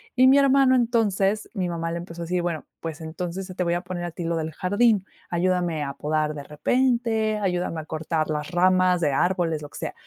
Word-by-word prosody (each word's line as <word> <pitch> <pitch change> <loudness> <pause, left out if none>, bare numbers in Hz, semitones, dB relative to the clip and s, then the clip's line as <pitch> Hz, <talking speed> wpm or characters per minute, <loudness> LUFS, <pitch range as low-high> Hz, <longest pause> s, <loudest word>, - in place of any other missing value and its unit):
Y 255 +1 +6
mi 270 +2 +7
hermano, 275 -1 +5
entonces, 215 -4 +1
mi 185 -4 -2
mamá 165 -1 -3
le 170 - -3
empezó 170 0 -8
a - - -3
decir: 180 +1 0
"Bueno, 170 -3 -3 0.2
pues 165 -1 -5
entonces, 180 +4 -5
te 180 - 0
voy 170 0 +1
a 175 - -1
poner 175 -2 -5
a 175 - -4
ti 170 +1 -6
lo 170 0 0
del 160 0 -2
jardín. 205 +2 +2 0.2
Ayúdame 175 -3 0
a 140 0 -4
podar 155 0 -1
de 145 -1 -7
repente, 225 - +1
ayúdame 180 -4 -1
a 155 - -7
cortar 155 0 -2
las 150 +2 -3
ramas 185 0 +3
de 150 -4 +1
árboles", 170 -1 +1
lo 145 - -8
que - - -11
sea. - - -4
175 Hz, 220 wpm, -24 LUFS, 160-200 Hz, 0.2 s, mi